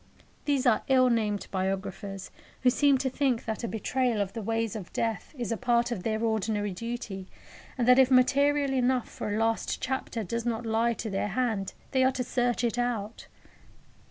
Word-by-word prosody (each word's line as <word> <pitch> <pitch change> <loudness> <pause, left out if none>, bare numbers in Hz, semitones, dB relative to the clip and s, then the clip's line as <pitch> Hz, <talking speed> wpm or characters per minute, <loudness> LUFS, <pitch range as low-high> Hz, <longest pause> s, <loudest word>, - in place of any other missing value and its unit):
Those 280 -2 +1
are 235 -4 +4
ill 255 -2 +5
named 210 -3 0
biographers 195 0 -3 0.3
who 250 - +5
seem 280 +1 +4
to 265 +1 -1
think 260 -4 0
that 220 +1 -3
a - - -1
betrayal 240 +1 0
of 195 -1 -1
the 225 - -4
ways 225 0 -1
of 200 -5 -7
death 225 -4 -2
is 240 -4 -3
a 230 - 0
part 240 -1 +1
of 220 -6 -2
their 220 +2 -1
ordinary 215 -2 0
duty, 210 -3 -5 0.5
and 245 -2 0
that 250 +1 +7
if 260 -1 +6
material 280 +2 +3
enough 255 -1 +1
for - - -5
a 205 - 0
last 225 0 0
chapter 255 -3 -3
does 230 +5 -3
not 235 0 -2
lie 225 +1 +2
to 220 -1 -5
their 195 +1 -1
hand 215 -3 -1 0.2
they 260 -1 +3
are 260 0 +3
to 250 - -2
search 245 -1 0
it 240 +1 0
out. 230 -3 -3
230 Hz, 190 wpm, -28 LUFS, 215-255 Hz, 0.5 s, that